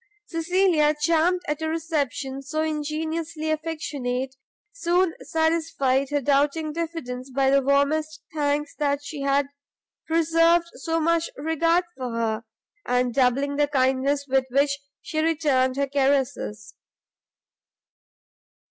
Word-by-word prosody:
Cecilia, 330 -2 +2
charmed 335 +3 +2
at 300 +1 -2
a 315 - -1
reception 290 -4 -2
so 310 +3 -2
ingenuously 315 +1 -2
affectionate, 280 -5 -3 0.4
soon 360 -6 +1
satisfied 320 -5 +1
her 290 0 +1
doubting 290 +3 +1
diffidence 305 -6 -5
by 265 +1 +2
the 275 0 +5
warmest 305 +3 +1
thanks 295 -1 0
that 285 -1 0
she 285 0 -6
had 275 0 +2 0.6
preserved 330 +1 +3
so 330 0 -2
much 335 +1 +1
regard 330 +4 +2
for 255 -2 -4
her, 225 -1 -1 0.4
and 250 0 +1
by 270 - +2
doubling 275 +3 +1
the 295 0 +3
kindness 275 +1 +1
with 265 -1 +2
which 280 +2 +2 0.2
she 310 -2 -3
returned 290 -5 +2
her 280 0 +1
caresses. 265 - 0
295 Hz, 120 wpm, -24 LUFS, 270-320 Hz, 0.6 s, the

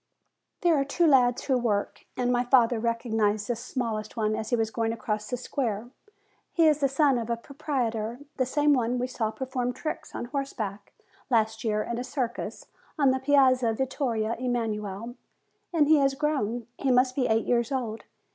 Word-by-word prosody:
There 345 -2 +4
are - - +2
two 285 +5 +1
lads 250 -5 +4
who 265 - +1
work; 210 -4 -1
and 245 -1 +1
my 245 0 +2
father 245 -2 +4
recognized 220 -3 0
the 240 - 0
smallest 230 -3 -4
one 215 -1 +1
as 220 0 -4
he 245 - +3
was 225 -1 0
going 225 0 -1
across 210 -2 -3
the 250 - -2
square. 240 -2 -3 0.6
He 330 - +3
is 300 -1 +4
the 275 -2 +2
son 275 -2 +3
of 225 - -4
the 235 - 0
proprietor, 240 -5 -3 0.2
the 255 -2 +1
same 295 +2 +3
one 245 -3 +1
whom 250 - -1
we - - +1
saw 235 -3 -2
perform 250 +1 -3
tricks 310 +5 -5
on - - -3
horse 275 +2 -3
back 200 -2 -5 0.4
last 220 -2 +1
year 215 -2 0
in 235 0 -3
a - - -2
circus 255 -3 -4 0.3
on 280 -3 +4
the 260 - 0
Piazza 260 -4 +4
Vittorio 235 -3 -1
Emanuele. 225 -3 -2 0.6
And 315 -4 +3
he 310 0 +6
has 275 -1 +2
grown; 265 -6 -1
he 275 - 0
must 255 0 +3
be 260 -3 +1
eight 220 0 +2
years 235 0 +1
old. 235 -5 -3
245 Hz, 190 wpm, -27 LUFS, 225-270 Hz, 0.6 s, he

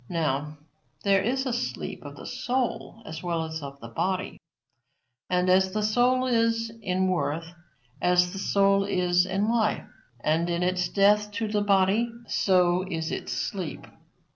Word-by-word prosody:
Now, 150 -2 -1 0.5
there 195 -1 +4
is 265 +4 0
a 255 - -1
sleep 240 - -4
of - - -9
the - - -10
soul 245 -3 -3
as 160 0 -7
well 170 -2 -1
as 160 0 -5
of 140 -1 -8
the 115 - -8
body. 185 +10 -2 0.9
And 180 0 +1
as 185 0 +3
the 215 - 0
soul 245 +4 +2
is 230 -2 +1
in 185 -1 0
worth, 165 -2 -2 0.5
as 180 0 +3
the 195 - -5
soul 195 0 +3
is 180 -2 +2
in 195 +1 0
its 220 - +1
life 220 -3 +1 0.3
and 160 +6 +1
in 170 +1 0
its 180 0 0
death 210 +1 +3
to 220 +1 -2
the 210 0 0
body, 205 +3 +2
so 180 -1 +2
is 160 -2 -3
its - - -4
sleep. 185 -5 -4
190 Hz, 165 wpm, -26 LUFS, 175-210 Hz, 0.9 s, there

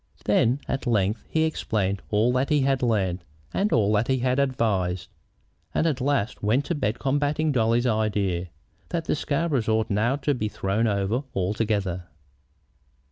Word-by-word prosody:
Then 125 +5 +2
at 135 -1 -2
length 105 -1 0
he 160 - +1
explained 105 -11 -1
all 110 +4 +2
that 130 +2 +1
he 150 -2 +3
had 135 -1 +1
learned, 95 -7 0 0.3
and 205 +2 +1
all 105 -2 +3
that 105 +2 +2
he 130 - +2
had 130 +1 +1
advised, 100 -10 0 0.7
and - - +2
at 145 -5 0
last 135 -4 0
went 120 +7 +1
to - - -1
bed 120 -8 -1
combating 145 +3 0
Dolly's 120 -1 +2
idea 105 -6 0 0.4
that 165 -2 -2
the - - +1
Scarboroughs 145 -5 0
ought 110 0 +1
now 110 +6 +2
to 145 +1 0
be 110 -5 -2
thrown 105 +3 0
over 100 +4 0
altogether. 95 -2 -1
115 Hz, 160 wpm, -25 LUFS, 105-135 Hz, 0.7 s, he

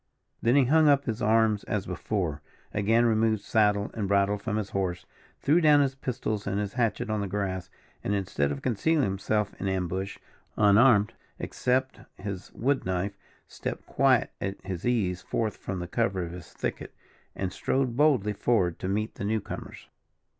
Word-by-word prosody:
Then 120 +3 +3
he 140 -2 +5
hung 155 +4 +5
up 140 -1 +4
his 115 -3 -3
arms 110 -1 +3
as 105 -2 -2
before, 90 -5 -2 0.3
again 115 +3 +3
removed 110 -2 +2
saddle 105 -2 +2
and 105 -3 -2
bridle 100 +1 +2
from 105 0 -2
his 105 -2 -3
horse, 90 -3 -2 0.4
threw 155 +5 +4
down 150 -2 +6
his 135 -1 +1
pistols 115 -6 -3
and 100 0 0
his 100 -1 -3
hatchet 115 -3 0
on 105 -1 0
the 100 - -2
grass, 95 -1 -3 0.3
and, 105 - 0
instead 90 -8 0
of 70 - -5
concealing 140 +6 +2
himself 105 +1 0
in 100 - -1
ambush, 95 +1 -2 0.4
unarmed, 105 +1 +5 0.2
except 130 +1 -1 0.2
his 100 -1 -6
wood 135 +4 0
knife, 95 +2 -2 0.3
stepped - - -5
quite - - +3
at 95 0 -3
his 95 +2 -4
ease 95 -7 +1
forth 110 -3 -2
from 95 - -5
the 90 -1 -4
cover 95 -2 0
of 85 - -6
his 90 -2 -10
thicket, - - -5 0.4
and 95 -2 -3
strode 130 +1 0
boldly 130 -8 +3
forward 95 -6 +1
to - - -3
meet 105 +3 -1
the - - -7
new 110 +2 +1
comers. - - -8
105 Hz, 175 wpm, -28 LUFS, 95-115 Hz, 0.4 s, down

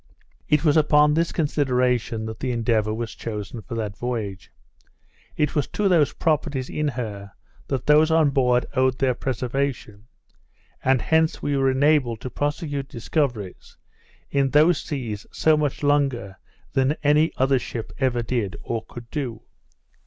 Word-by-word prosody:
It 150 +2 +3
was 150 0 +4
upon 150 -1 +4
this 165 +2 +1
consideration 125 -7 0
that 110 0 -6
the 130 - -2
Endeavour 115 -2 +1
was 115 +1 -4
chosen 110 0 -6
for 120 +2 -7
that 105 -3 -3
voyage. 105 -6 -4 0.9
It 150 - +1
was 145 - 0
to 210 - 0
those 165 -7 +3
properties 150 -5 -1
in 150 0 -1
her 105 -7 -5 0.3
that 135 -2 -2
those 150 +2 +5
on 160 -3 +4
board 125 -2 +2
owed 130 -1 +2
their 130 -1 +2
preservation; 125 -3 -3 0.8
and 130 -1 +2
hence 160 0 +1
we 145 - 0
were 135 -1 +2
enabled 130 -4 +2
to 130 - -6
prosecute 145 0 -3
discoveries 120 - -3 0.5
in 140 -1 +2
those 155 +5 +4
seas 115 -8 -5
so 160 -1 +3
much 150 -1 -2
longer 135 -9 0 0.3
than 135 +2 +2
any 150 +2 +4
other 135 0 +3
ship 115 -1 -6
ever 125 -3 +1
did, 115 -5 -2
or 115 -1 -3
could 120 -1 -11
do. 120 -6 -4
130 Hz, 150 wpm, -23 LUFS, 115-150 Hz, 0.9 s, those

